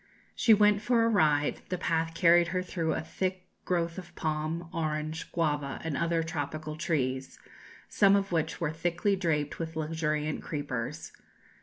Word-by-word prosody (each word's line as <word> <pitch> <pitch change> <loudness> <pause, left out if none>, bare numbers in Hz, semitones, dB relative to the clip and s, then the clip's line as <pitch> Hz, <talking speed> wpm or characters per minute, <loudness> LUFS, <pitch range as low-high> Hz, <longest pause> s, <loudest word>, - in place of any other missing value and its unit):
She 230 - +3
went 210 0 +4
for 230 +1 +3
a - - +3
ride; 150 -8 +2
the 180 - -1
path 165 -2 -1
carried 170 0 +5
her 185 +2 -1
through 165 -3 -1
a - - -2
thick 185 +3 -3 0.2
growth 170 0 -1
of 175 -1 -12
palm, 155 +2 -2
orange, 155 0 -3
guava, 150 -4 -1
and 160 -3 -2
other 170 +1 +1
tropical 155 -1 -4
trees, 135 -6 -2 0.5
some 200 -1 +4
of 195 -1 0
which 165 -3 -1
were 165 -4 0
thickly 175 +5 0
draped 155 -6 -1
with 165 -1 -4
luxuriant 155 -1 -1
creepers. 145 -3 -4
165 Hz, 155 wpm, -29 LUFS, 155-175 Hz, 0.5 s, carried